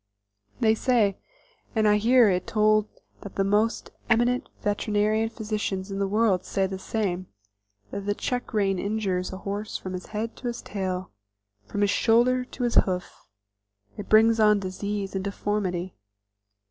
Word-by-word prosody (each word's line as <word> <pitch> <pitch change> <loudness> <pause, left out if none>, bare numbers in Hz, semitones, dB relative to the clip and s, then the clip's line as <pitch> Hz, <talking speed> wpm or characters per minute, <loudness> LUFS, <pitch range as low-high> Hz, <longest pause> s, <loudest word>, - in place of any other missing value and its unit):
They 220 -1 +4
say, 220 -4 +2 0.6
and 215 -1 +3
I 210 0 +5
hear 235 +2 +5
it 180 -2 0
told 215 -1 +3 0.3
that 200 - -9
the 195 - +2
most 210 +3 +1 0.2
eminent 240 +2 +2
veterinary 210 +1 +1
physicians 210 -3 -3
in 195 - -3
the 200 - +1
world 205 -2 +2
say 195 -1 0
the 190 0 -4
same, 185 -3 -2 0.6
that 200 0 -5
the 205 - +1
check 245 +3 -3
rein 195 -3 +1
injures 200 -3 -1
a 190 - -6
horse 205 +2 -4
from 185 - -7
his 185 - -6
head 225 +2 -4
to 250 - -5
his 240 0 -4
tail, 185 -2 -4 0.6
from 205 - -3
his 205 -1 +3
shoulder 240 +4 +3
to 250 - -6
his 240 - +1
hoof; 180 -2 +1 0.8
it 205 - -8
brings 225 +1 +5
on 210 -1 +5
disease 195 +1 -4
and 190 -1 -2
deformity. 195 -3 -2
210 Hz, 160 wpm, -26 LUFS, 195-220 Hz, 0.8 s, I